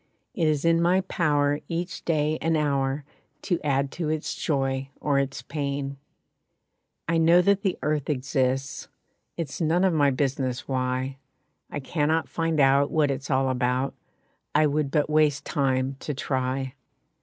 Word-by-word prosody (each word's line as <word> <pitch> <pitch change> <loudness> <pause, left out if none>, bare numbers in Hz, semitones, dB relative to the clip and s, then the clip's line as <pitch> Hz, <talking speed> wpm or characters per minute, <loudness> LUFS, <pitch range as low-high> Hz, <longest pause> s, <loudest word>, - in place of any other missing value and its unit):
It 165 -4 +1
is 150 0 +1
in 165 0 +4
my 180 +2 +3
power 145 -6 +1
each 175 +2 -4
day 155 -1 +1
and 165 0 +2
hour 140 -1 0 0.4
To 175 -4 0
add 140 -1 +1
to 165 -3 -3
its 155 -1 -2
joy 135 -2 -1
or 140 -2 +1
its 135 -1 -3
pain. 140 -1 -3 1.1
I 165 0 +2
know 165 +2 +6
that 200 +1 +3
the 195 -3 0
earth 150 -1 0
exists, 135 0 -1 0.5
It 165 -3 -2
is 135 - -7
none 165 +3 +2
of 190 -2 +3
my 145 -3 +4
business 130 -2 -1
why. 130 0 -1 0.5
I - - -4
cannot 155 +3 0
find 165 -2 -1
out 140 +1 +4
what 150 -3 +2
it's 135 +1 -5
all 135 -1 +2
about, 130 +1 0 0.6
I 155 +1 +5
would 150 -1 +1
but 145 +1 +1
waste 150 -2 +2
time 135 -2 0
to 150 - -4
try. 130 -1 -2
145 Hz, 155 wpm, -26 LUFS, 135-160 Hz, 1.1 s, know